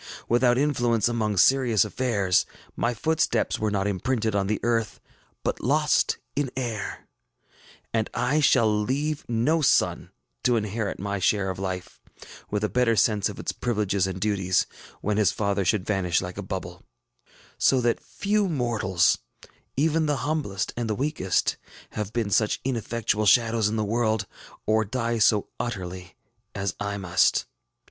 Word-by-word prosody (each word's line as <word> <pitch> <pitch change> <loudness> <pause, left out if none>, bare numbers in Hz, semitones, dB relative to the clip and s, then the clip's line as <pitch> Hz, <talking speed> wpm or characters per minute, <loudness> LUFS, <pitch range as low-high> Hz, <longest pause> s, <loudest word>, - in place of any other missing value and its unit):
Without 120 +1 +3
influence 120 -6 +2
among 110 -4 -1
serious 125 -3 +4
affairs, 105 -5 +1 0.3
my 120 - 0
footsteps 135 -1 0
were 110 - 0
not 100 -1 -1
imprinted 110 +3 -1
on 100 -1 0
the 105 - 0
earth, 115 -2 0 0.4
but - - -2
lost - - +2 0.2
in 140 -1 0
air; 115 -6 -4 0.9
and 110 -1 0
I 125 +5 +1
shall 130 -6 +4
leave 145 +6 -1
no 120 +8 +2
son 140 - +2 0.3
to 125 - +2
inherit 105 -1 -2
my 100 +1 -2
share 95 0 +1
of 95 - -8
life, 95 -1 -5 0.5
with 105 0 -2
a - - +3
better 125 0 +2
sense 105 0 +2
of - - -8
its - - -3
privileges 100 -5 0
and 95 0 -4
duties, 95 -3 +1 0.4
when 105 0 0
his 105 -2 +3
father 100 -1 0
should 95 +1 +1
vanish 95 -5 +1
like 90 -1 -6
a - - -2
bubble; - - -6 0.8
so 135 - +4
that 120 -1 +1
few 205 -1 -1
mortals, 115 - +1 0.6
even 160 +2 +2
the 145 -1 +1
humblest 140 -11 -2
and 120 -2 -3
the 110 - 0
weakest, 135 - 0 0.3
have 105 -1 -4
been 115 -3 -2
such 105 +2 +2
ineffectual 115 -4 -1
shadows 115 0 +4
in 110 - -2
the 110 - 0
world, 110 0 0 0.4
or 110 +1 +3
die 115 +1 -2
so 105 -1 +3
utterly 95 -6 -5 0.4
as 100 0 -2
I 100 0 -3
must. 95 -2 +2
110 Hz, 155 wpm, -25 LUFS, 100-120 Hz, 0.9 s, serious